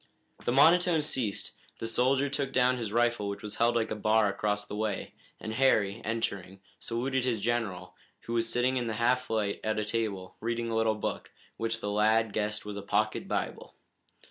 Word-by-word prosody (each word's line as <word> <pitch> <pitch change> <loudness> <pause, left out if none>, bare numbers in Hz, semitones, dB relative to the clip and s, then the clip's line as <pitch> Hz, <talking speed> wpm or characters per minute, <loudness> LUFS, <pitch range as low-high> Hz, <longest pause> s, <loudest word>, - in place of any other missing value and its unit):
The - - +2
monotone 165 +4 +5
ceased, 125 -9 -1 0.3
the - - -5
soldier 130 +4 +2
took 140 -1 -1
down 125 0 +3
his 110 -3 -3
rifle 120 -2 +1
which 100 - -6
was 105 0 -6
held 120 +1 +3
like 115 -1 0
a - - -1
bar 110 0 +3
across 105 +1 -1
the 105 - -7
way, 105 -2 -3 0.3
and 110 - -5
Harry, 110 -5 +2
entering, 100 -4 -3 0.2
saluted 130 +3 -1
his 120 -4 0
general, 100 -5 -2 0.3
who 115 - -6
was 115 -1 +1
sitting 125 +2 +1
in 120 -2 -1
the 110 - -2
half 125 +3 +1
light 105 -3 0
at 110 0 0
a 105 - 0
table, 105 -4 -3
reading 115 +1 -2
a - - -1
little 110 -1 +2
book, 105 - -4 0.3
which 115 0 -2
the 105 - -2
lad 110 +1 +3
guessed 105 0 -2
was 105 -1 -5
a - - -4
pocket - - 0
Bible. - - -3
115 Hz, 195 wpm, -29 LUFS, 105-120 Hz, 0.3 s, monotone